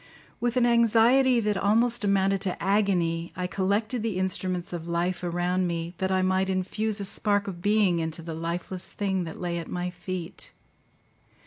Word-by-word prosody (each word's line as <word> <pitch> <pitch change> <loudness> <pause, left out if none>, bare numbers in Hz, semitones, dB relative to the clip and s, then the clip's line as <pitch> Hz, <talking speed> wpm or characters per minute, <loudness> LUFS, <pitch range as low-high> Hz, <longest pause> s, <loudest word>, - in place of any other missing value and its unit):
With 240 +1 0
an 245 - +4
anxiety 235 +2 +4
that 210 -2 0
almost 230 +4 +2
amounted 195 -1 +2
to 185 - -2
agony, 180 -5 +1
I 180 - -2
collected 205 +6 0
the 220 -4 -2
instruments 185 -1 -2
of 170 -1 -5
life 175 +2 -1
around 175 +1 0
me, 170 0 -3
that 190 0 0
I 185 0 +2
might 190 +1 +1
infuse 205 +3 -1
a 200 - -2
spark 205 +1 +1
of 175 -3 -6
being 205 -3 +3
into 160 0 -3
the 165 0 -5
lifeless 170 +3 -4
thing 190 -3 -1
that 160 - -8
lay 175 -1 -2
at 165 - -8
my 180 0 -3
feet. 180 0 -6
190 Hz, 175 wpm, -26 LUFS, 175-210 Hz, -, an